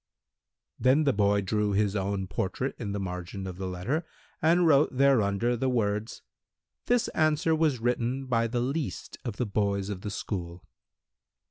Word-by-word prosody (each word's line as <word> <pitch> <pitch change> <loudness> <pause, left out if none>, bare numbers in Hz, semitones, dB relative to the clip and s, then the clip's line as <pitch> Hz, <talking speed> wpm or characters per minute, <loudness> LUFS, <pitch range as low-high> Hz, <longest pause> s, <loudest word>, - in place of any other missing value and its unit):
Then 130 +5 +4
the 140 -3 +3
boy 100 0 +2
drew 105 +1 0
his 100 0 +1
own 100 -1 -1
portrait 100 +7 -2
in 105 -4 -3
the 100 - -2
margin 90 0 -5
of 90 -1 -6
the 95 0 -4
letter 95 - -2 0.4
and 170 +3 +4
wrote 140 -4 +4
thereunder 120 -4 +3
the 130 +3 0
words: 105 -3 -1 0.6
"This 245 -1 +2
answer 155 0 +2
was 155 -5 +1
written 125 +3 -1
by 115 -2 +1
the 120 +1 -1
least 140 +5 -3
of 115 -5 -5
the 125 - 0
boys 100 -1 -1
of 95 -3 -5
the 105 - -4
school." 90 -4 -5
110 Hz, 160 wpm, -28 LUFS, 100-135 Hz, 0.6 s, Then